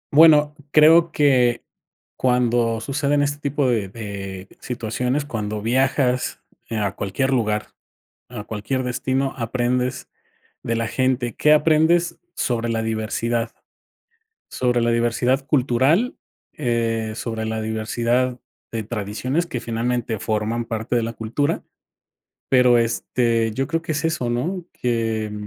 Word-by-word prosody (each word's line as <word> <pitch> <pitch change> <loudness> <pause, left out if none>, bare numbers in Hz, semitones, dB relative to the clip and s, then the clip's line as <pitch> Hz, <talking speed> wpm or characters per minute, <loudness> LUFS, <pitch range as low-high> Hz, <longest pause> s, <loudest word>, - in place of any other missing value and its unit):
Bueno, 150 -1 +7
creo 160 +2 +6
que 125 -5 +3 0.5
cuando 120 -2 +2
suceden 145 +2 +1
este 145 0 -2
tipo 140 -1 0
de 110 -5 +1
de 100 -3 -7
situaciones, 125 +4 -2
cuando 105 -5 -4
viajas, 130 +1 +1 0.3
eh, 115 - -2
a 100 -2 0
cualquier 130 +8 -1
lugar, 105 -4 0 0.6
a 115 -4 -7
cualquier 110 +5 -3
destino, 130 +2 -1
aprendes 125 +2 -1 0.5
de 115 - -1
la 115 0 -1
gente. 130 -1 0
¿Qué 150 - +4
aprendes? 160 +3 +3 0.2
Sobre 120 -1 -1
la 115 -1 0
diversidad, 115 +1 -1 1.0
sobre 125 -1 +1
la 120 - +1
diversidad 120 +3 +1
cultural, 145 - +2 0.4
eh, 115 -4 -1
sobre 115 -2 -3
la 110 0 -2
diversidad 120 +3 -1 0.3
de 115 -1 -2
tradiciones 115 - -2
que 125 -8 -4
finalmente 115 -1 -2
forman 110 +2 -1
parte 115 +2 -2
de 120 - +2
la 115 +1 -3
cultura. 115 +6 -1 0.9
Pero, 125 -2 +5
este, 115 -1 0
yo 135 +4 -1
creo 165 +1 0
que 160 - -3
es 150 +2 -2
eso, 160 -7 0
¿no? 170 +9 -2
Que 115 -3 -1
120 Hz, 125 wpm, -22 LUFS, 115-135 Hz, 1.0 s, Bueno